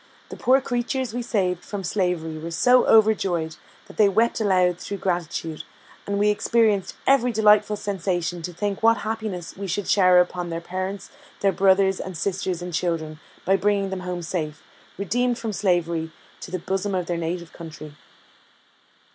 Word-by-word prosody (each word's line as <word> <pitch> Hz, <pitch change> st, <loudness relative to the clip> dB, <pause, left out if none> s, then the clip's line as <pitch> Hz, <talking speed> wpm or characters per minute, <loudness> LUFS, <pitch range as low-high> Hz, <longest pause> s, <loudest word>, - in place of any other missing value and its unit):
The -, -, -7 dB
poor 260 Hz, +2 st, +3 dB
creatures 245 Hz, -1 st, -2 dB
we 245 Hz, -, -2 dB
saved 185 Hz, -7 st, -1 dB
from 205 Hz, -2 st, -6 dB
slavery 175 Hz, -4 st, -1 dB
were 165 Hz, +2 st, -6 dB
so 250 Hz, +9 st, +4 dB
overjoyed, 195 Hz, -7 st, +3 dB, 0.3 s
that -, -, -15 dB
they 210 Hz, -2 st, +5 dB
wept 225 Hz, +3 st, +1 dB
aloud 180 Hz, -4 st, +2 dB
through 200 Hz, -, -5 dB
gratitude, 170 Hz, -3 st, -3 dB, 0.5 s
and 200 Hz, 0 st, -1 dB
we 210 Hz, +1 st, +3 dB
experienced 210 Hz, -2 st, +1 dB
every 255 Hz, -2 st, +4 dB
delightful 210 Hz, -1 st, +4 dB
sensation 180 Hz, -4 st, -2 dB
to 180 Hz, -, -5 dB
think 200 Hz, +3 st, -3 dB
what 230 Hz, +1 st, +5 dB
happiness 215 Hz, -6 st, -4 dB
we 195 Hz, 0 st, -5 dB
should 190 Hz, +2 st, -2 dB
shower 185 Hz, -2 st, +5 dB
upon 180 Hz, 0 st, 0 dB
their 165 Hz, 0 st, -3 dB
parents, 185 Hz, +3 st, -5 dB, 0.3 s
their 195 Hz, -, +3 dB
brothers 190 Hz, +1 st, +3 dB
and 185 Hz, -3 st, -6 dB
sisters 185 Hz, -1 st, -2 dB
and 180 Hz, 0 st, -6 dB
children, 160 Hz, -2 st, -2 dB, 0.3 s
by 195 Hz, -, +4 dB
bringing 200 Hz, -1 st, +1 dB
them 190 Hz, -, -3 dB
home 180 Hz, -1 st, -5 dB
safe, 155 Hz, -3 st, -4 dB, 0.3 s
redeemed 240 Hz, +5 st, 0 dB
from 225 Hz, -3 st, -4 dB
slavery, 170 Hz, -4 st, 0 dB, 0.3 s
to -, -, -8 dB
the 185 Hz, -, -2 dB
bosom 195 Hz, +2 st, -2 dB
of 180 Hz, -1 st, -1 dB
their 175 Hz, -, -2 dB
native 170 Hz, 0 st, -4 dB
country. 155 Hz, -3 st, -10 dB
190 Hz, 165 wpm, -24 LUFS, 175-210 Hz, 0.5 s, they